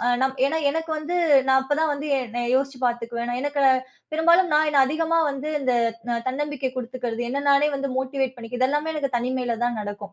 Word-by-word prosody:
அ -, -, +1 dB
நம் 265 Hz, 0 st, +2 dB
ஏன்னா 300 Hz, +4 st, +1 dB
எனக்கு 325 Hz, +1 st, -3 dB
வந்து 340 Hz, +4 st, -3 dB, 0.3 s
நா -, -, +5 dB
அப்பதான் 295 Hz, +3 st, 0 dB
வந்து 290 Hz, +1 st, -3 dB
எ -, -, +1 dB, 0.2 s
நான் 240 Hz, 0 st, -2 dB
யோசிச்சு 270 Hz, -1 st, 0 dB
பாத்துக்குவேன். 235 Hz, 0 st, -2 dB
நான் 245 Hz, +1 st, -2 dB
எனக்கு 290 Hz, 0 st, -1 dB, 0.5 s
பெரும்பாலும் 340 Hz, +3 st, +4 dB
நான் 310 Hz, +1 st, +4 dB
என்ன 285 Hz, -2 st, +4 dB
அதிகமா 325 Hz, +3 st, 0 dB
வந்து 275 Hz, +2 st, -5 dB
இந்த 260 Hz, -2 st, +1 dB, 0.4 s
ந 235 Hz, -, 0 dB
தன்னம்பிக்கை 285 Hz, -1 st, -3 dB
குடுத்துக்கிறது, 245 Hz, -1 st, -4 dB
என்ன 280 Hz, +3 st, -2 dB
நானே 285 Hz, +2 st, +4 dB
வந்து 275 Hz, 0 st, -3 dB
மோட்டிவேட் 265 Hz, -1 st, -2 dB
பண்ணிக்கறது, 240 Hz, +2 st, -7 dB
இது 255 Hz, -, +4 dB
எல்லாமே 295 Hz, +2 st, -1 dB
எனக்குத் 275 Hz, -4 st, -1 dB
தனிமையில 250 Hz, -1 st, -2 dB
தான் 240 Hz, -2 st, -1 dB
நடக்கும். 205 Hz, 0 st, -7 dB
270 Hz, 200 wpm, -24 LUFS, 245-295 Hz, 0.5 s, நா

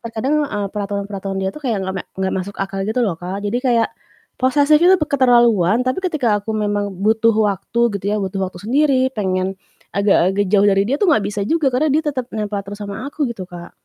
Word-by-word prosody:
terkadang, 230 Hz, +5 st, -1 dB
eee, 205 Hz, -6 st, -3 dB
peraturan-peraturan 200 Hz, -1 st, -4 dB
dia 190 Hz, 0 st, -1 dB
tuh 300 Hz, -, -10 dB
kayak 225 Hz, -5 st, 0 dB
nggak 190 Hz, 0 st, -3 dB
mek 195 Hz, -, -5 dB
nggak 190 Hz, 0 st, -1 dB
masuk 190 Hz, +2 st, -4 dB
akal 195 Hz, 0 st, -3 dB
gitu 220 Hz, +4 st, -1 dB
loh 200 Hz, -7 st, 0 dB
Kak. 180 Hz, +3 st, -5 dB
Jadi 205 Hz, +4 st, 0 dB
kayak 235 Hz, -4 st, +2 dB, 0.5 s
posesif 285 Hz, +3 st, +4 dB
itu 370 Hz, +2 st, +7 dB
keterlaluan, 240 Hz, -, +3 dB
tapi 255 Hz, +9 st, -1 dB
ketika 255 Hz, -, +1 dB
aku 220 Hz, -, -5 dB
memang 205 Hz, -1 st, -1 dB
butuh 225 Hz, +1 st, +4 dB
waktu 210 Hz, +1 st, 0 dB, 0.2 s
gitu 190 Hz, -, -17 dB
ya, -, -, +1 dB
butuh 195 Hz, 0 st, -3 dB
waktu 185 Hz, -1 st, -10 dB
sendiri, 260 Hz, +4 st, +2 dB
pengen 190 Hz, -2 st, -1 dB, 0.4 s
agak 195 Hz, -2 st, +3 dB
agak 205 Hz, +1 st, +1 dB
jauh 205 Hz, 0 st, +4 dB
dari 195 Hz, -1 st, +4 dB
dia 275 Hz, -, +1 dB
tuh 410 Hz, -, +3 dB
nggak 215 Hz, -, +3 dB
bisa 205 Hz, +1 st, -3 dB
juga 315 Hz, 0 st, +2 dB
karena 255 Hz, +5 st, +1 dB
dia 310 Hz, +2 st, +2 dB
tetep 270 Hz, -5 st, -2 dB
nempel 210 Hz, -1 st, -2 dB
terus 205 Hz, +1 st, -8 dB
sama 205 Hz, +5 st, -6 dB
aku 285 Hz, -3 st, -2 dB
gitu 200 Hz, -5 st, -6 dB
Kak. 175 Hz, -1 st, -10 dB
210 Hz, 210 wpm, -19 LUFS, 195-255 Hz, 0.5 s, itu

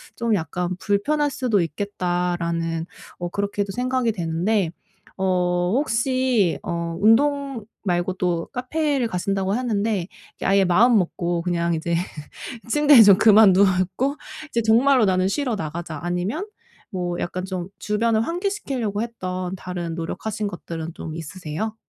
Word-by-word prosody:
좀 235 Hz, -1 st, 0 dB
약간 180 Hz, +2 st, -2 dB
불편할 290 Hz, +9 st, +1 dB
수도 245 Hz, -6 st, +1 dB
있겠다.'라는 170 Hz, -2 st, -2 dB, 0.3 s
어 175 Hz, -, -2 dB
그렇게도 200 Hz, +1 st, -2 dB
생각이 250 Hz, -1 st, 0 dB
되는데 175 Hz, +2 st, 0 dB, 0.5 s
어 180 Hz, 0 st, +1 dB
혹시 255 Hz, -, +1 dB
어 170 Hz, -1 st, -3 dB
운동 275 Hz, +2 st, +2 dB, 0.2 s
말고도 175 Hz, -1 st, 0 dB
카페를 275 Hz, 0 st, 0 dB
가신다고 195 Hz, 0 st, -1 dB
했는데 215 Hz, -6 st, -1 dB, 0.3 s
그 -, -, -5 dB
아예 195 Hz, 0 st, +4 dB
마음먹고 175 Hz, -4 st, +2 dB
그냥 170 Hz, -1 st, 0 dB
이제 170 Hz, +1 st, -1 dB, 0.7 s
'침대에 295 Hz, -1 st, +7 dB
좀 200 Hz, -2 st, +7 dB
그만 215 Hz, -2 st, +7 dB
눕고 190 Hz, +8 st, +2 dB, 0.3 s
이제 235 Hz, -, 0 dB
정말로 240 Hz, +2 st, +4 dB
나는 185 Hz, -1 st, +2 dB
쉬러 250 Hz, +2 st, -1 dB
나가자.' 160 Hz, -2 st, -5 dB
아니면 180 Hz, -, -2 dB, 0.4 s
뭐 175 Hz, -3 st, -3 dB
약간 185 Hz, +1 st, -3 dB
좀 185 Hz, -1 st, -5 dB
주변을 220 Hz, +1 st, +1 dB
환기시키려고 275 Hz, -, -2 dB
했던 185 Hz, -5 st, -4 dB
다른 175 Hz, -3 st, -5 dB
노력하신 210 Hz, +6 st, -4 dB
것들은 165 Hz, -3 st, -6 dB
좀 160 Hz, -, -7 dB
있으세요? 165 Hz, +6 st, -5 dB
195 Hz, 290 characters per minute, -23 LUFS, 175-230 Hz, 0.7 s, 침대에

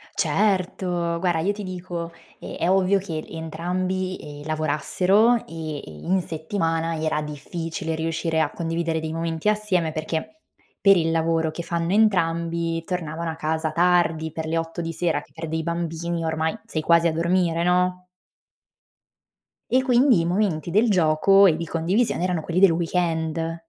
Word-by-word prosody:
Certo! 180 Hz, -4 st, 0 dB
Guarda, 175 Hz, -2 st, +1 dB
io 200 Hz, +5 st, +1 dB
ti 210 Hz, -, -7 dB
dico: 175 Hz, -2 st, -5 dB, 0.3 s
è 170 Hz, -, -3 dB
ovvio 190 Hz, +1 st, +3 dB
che 165 Hz, -5 st, -5 dB
entrambi, 180 Hz, +3 st, -3 dB
ehm, 145 Hz, 0 st, -10 dB
lavorassero 185 Hz, +9 st, +2 dB
e, 155 Hz, -1 st, -5 dB
ehm, 80 Hz, -, -7 dB
in 190 Hz, -, +2 dB
settimana 165 Hz, 0 st, -2 dB
era 155 Hz, -1 st, 0 dB
difficile 160 Hz, +3 st, -5 dB
riuscire 160 Hz, 0 st, -1 dB
a 150 Hz, -, 0 dB
condividere 165 Hz, -1 st, -2 dB
dei 160 Hz, 0 st, -4 dB
momenti 165 Hz, +2 st, -3 dB
assieme 200 Hz, -6 st, 0 dB
perché 160 Hz, -, -4 dB, 0.4 s
per 195 Hz, -1 st, +6 dB
il 165 Hz, -1 st, +1 dB
lavoro 165 Hz, 0 st, +1 dB
che 170 Hz, -, -6 dB
fanno 170 Hz, +2 st, -1 dB
entrambi 170 Hz, -5 st, +1 dB
tornavano 165 Hz, -2 st, -3 dB
a -, -, -7 dB
casa 160 Hz, 0 st, -1 dB
tardi, 165 Hz, -2 st, +2 dB
per 160 Hz, 0 st, -5 dB
le 165 Hz, +1 st, 0 dB
8 165 Hz, +1 st, -3 dB
di 165 Hz, -, -3 dB
sera, 165 Hz, -2 st, 0 dB
che 145 Hz, -, -21 dB
per 165 Hz, +2 st, -6 dB
dei 160 Hz, +1 st, -2 dB
bambini 170 Hz, 0 st, -3 dB
ormai 160 Hz, +4 st, -1 dB
sei 160 Hz, -8 st, -3 dB
quasi 170 Hz, +1 st, +4 dB
a 165 Hz, -, 0 dB
dormire, 170 Hz, 0 st, +1 dB
no? 180 Hz, +1 st, +1 dB, 1.7 s
E 260 Hz, -, +4 dB
quindi, 250 Hz, -3 st, +4 dB
i 165 Hz, -, 0 dB
momenti 175 Hz, -3 st, 0 dB
del 215 Hz, +7 st, +3 dB
gioco 190 Hz, +2 st, +5 dB
e 165 Hz, -, +5 dB
di 170 Hz, +1 st, -4 dB
condivisione 175 Hz, +5 st, 0 dB
erano 180 Hz, -3 st, 0 dB
quelli 170 Hz, +3 st, -1 dB
del 195 Hz, -3 st, +7 dB
weekend. 165 Hz, -1 st, -1 dB
170 Hz, 155 wpm, -23 LUFS, 160-180 Hz, 1.7 s, del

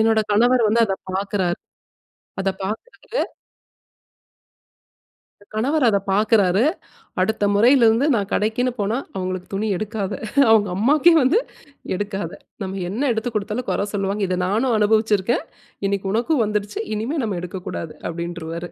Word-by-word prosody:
என்னோட 220 Hz, 0 st, +4 dB
கணவர் 240 Hz, +2 st, +4 dB
வந்து 230 Hz, +2 st, +3 dB
அத 195 Hz, -1 st, -1 dB, 0.2 s
பார்க்கிறாரு. 190 Hz, -2 st, -1 dB, 0.8 s
அதை 195 Hz, 0 st, +1 dB
பார்க்கிறாரு. 470 Hz, -, -4 dB, 2.2 s
என் 205 Hz, -, -20 dB
கணவர் 270 Hz, +6 st, +1 dB
அத 205 Hz, -3 st, +4 dB
பார்க்கிறாரு, 205 Hz, -1 st, +3 dB, 0.6 s
அடுத்த 220 Hz, +2 st, 0 dB
முறையிலிருந்து 235 Hz, +2 st, +5 dB
நான் 200 Hz, -3 st, -1 dB
கடைக்குன்னு 235 Hz, +4 st, +1 dB
போனா, 210 Hz, +4 st, 0 dB, 0.2 s
அவுங்களுக்கு 185 Hz, -1 st, -3 dB
துணி 205 Hz, +3 st, -1 dB
எடுக்காத! 210 Hz, -1 st, -3 dB, 0.4 s
அவுங்க 210 Hz, -3 st, +5 dB
அம்மாக்கே 290 Hz, -, +5 dB
வந்து 275 Hz, -, +4 dB, 0.6 s
எடுக்காத! 205 Hz, 0 st, -3 dB, 0.3 s
நம்ம 190 Hz, 0 st, -4 dB
என்ன 250 Hz, +8 st, 0 dB
எடுத்து 230 Hz, +2 st, -2 dB
கொடுத்தாலும் 215 Hz, +4 st, -3 dB
கொற 200 Hz, -, 0 dB
சொல்லுவாங்க, 200 Hz, +1 st, -1 dB
இத 180 Hz, 0 st, -1 dB
நானும் 225 Hz, +5 st, +1 dB
அனுபவிச்சிருக்கேன், 215 Hz, 0 st, +2 dB, 0.4 s
இன்னக்கி 195 Hz, -1 st, -1 dB
உனக்கும் 240 Hz, +3 st, +2 dB
வந்துருச்சு. 210 Hz, 0 st, -2 dB, 0.2 s
இனிமே 235 Hz, +9 st, -2 dB
நம்ம 200 Hz, -5 st, -2 dB
எடுக்கக்கூடாது 175 Hz, -3 st, -6 dB
அப்பிடின்ருவாரு 170 Hz, 0 st, -5 dB
210 Hz, 125 wpm, -21 LUFS, 195-230 Hz, 2.2 s, முறையிலிருந்து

